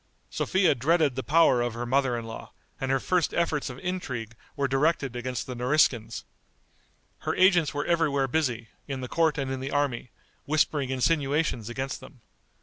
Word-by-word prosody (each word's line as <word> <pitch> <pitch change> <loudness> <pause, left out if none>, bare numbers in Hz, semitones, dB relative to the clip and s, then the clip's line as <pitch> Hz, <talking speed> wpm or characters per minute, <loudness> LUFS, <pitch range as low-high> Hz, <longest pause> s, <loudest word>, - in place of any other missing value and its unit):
Sophia 190 -3 +2
dreaded 150 +2 +2
the 130 - -2
power 145 -4 +4
of 120 -1 -2
her 120 +1 -3
mother 130 -1 +1
in 115 - -5
law, 115 - -8 0.3
and 135 - -2
her 135 0 +2
first 180 +3 0
efforts 160 -5 0
of 125 - -8
intrigue 130 -10 -4 0.2
were 140 -2 0
directed 135 -1 +1
against 125 -1 -3
the 130 - -6
Nariskins. 120 -3 +1 1.0
Her - - -2
agents 180 -6 +4
were 145 +1 -3
everywhere 150 -5 +2
busy, 120 -5 -1 0.2
in 135 -2 -4
the 125 - -4
court 160 +2 +1
and 135 -2 -2
in 135 - -3
the 135 +1 -4
army, 140 -4 -1 0.4
whispering 150 -2 +1
insinuations 135 -3 0
against 130 +3 -4
them. 130 -1 -15
135 Hz, 170 wpm, -27 LUFS, 125-155 Hz, 1.0 s, power